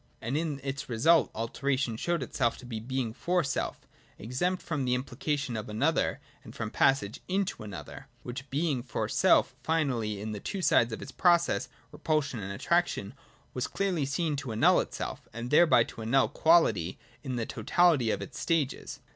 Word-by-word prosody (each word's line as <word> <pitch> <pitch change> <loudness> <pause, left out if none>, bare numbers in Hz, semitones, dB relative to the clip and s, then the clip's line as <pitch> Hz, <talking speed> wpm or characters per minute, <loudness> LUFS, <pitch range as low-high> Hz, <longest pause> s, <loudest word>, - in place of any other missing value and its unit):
And 115 +5 -3
in 155 -3 -1
its 135 -1 -4
result 155 +8 +4
Alteration 130 +2 -1
showed 170 +5 -1
itself 120 -1 0
to - - -12
be 115 -3 -5
Being 125 0 -3
for 180 +7 0
self, 135 -2 -2 0.4
exempt 155 - -2
from 150 -6 -2
implication 130 +1 -1
of 110 -1 -5
another 145 +10 +1 0.2
and - - -12
from - - -4
passage 135 -6 +2
into 190 - -1
another; 100 -3 -8
— - - -34
which 130 +3 -7
Being 145 -2 0
for - - -3
self, - - +3
finally, 125 -10 0
in 110 +2 -4
the 105 - -5
two 190 - -4
sides 120 -6 +4
of 110 - -5
its - - -9
process. 175 -2 +2 0.2
Repulsion 150 -6 -1
and 100 -1 -5
Attraction, 120 - 0 0.4
was 125 - -2
clearly 185 -7 -1
seen 150 +2 -1
to 135 -3 -5
annul 110 - +4
itself, - - -5
and 115 +2 -5
thereby 155 -6 +6
to 115 - -10
annul 125 +4 +3
quality 110 - +3 0.3
in 130 -2 -3
the 115 -2 -1
totahty 130 +1 +2
of - - -2
its - - -9
stages. 160 -6 -1
135 Hz, 170 wpm, -29 LUFS, 115-160 Hz, 0.4 s, thereby